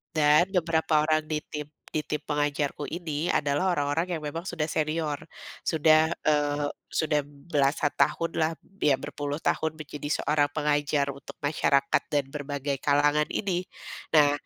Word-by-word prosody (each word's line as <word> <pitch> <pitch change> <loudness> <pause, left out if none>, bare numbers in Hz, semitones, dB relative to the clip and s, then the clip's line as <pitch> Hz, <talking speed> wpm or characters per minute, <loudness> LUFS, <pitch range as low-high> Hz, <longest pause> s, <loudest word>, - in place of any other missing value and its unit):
dan 150 +2 +5
beberapa 160 -3 +2
orang 155 0 +2
di 155 0 -1
tim 150 -1 -6 0.2
di 155 - -2
tim 150 - -3
pengajarku 145 0 -1
ini 165 -1 -2
adalah 145 +6 +1
orang-orang 145 +3 0
yang - - -15
memang 165 +4 -4
sudah 160 -4 -2
senior, 155 -1 -1 0.5
sudah, 160 0 +4 0.2
eee, 145 -1 +2 0.2
sudah 150 -2 +1
belasan 145 0 0
tahunlah 160 +2 +1
b 195 -6 -1
iya 135 - +5
berpuluh 145 +1 -4
tahun 160 -1 0
menjadi 150 0 -3
seorang 145 -1 +2
pengajar 145 -1 +1
untuk 140 - -11
masyarakat 140 -1 +2
dan 145 -2 +2
berbagai 145 0 -3
kalangan 145 +1 +3
ini, 185 -3 -1 0.5
nah 145 -1 +7
150 Hz, 140 wpm, -27 LUFS, 145-160 Hz, 0.5 s, nah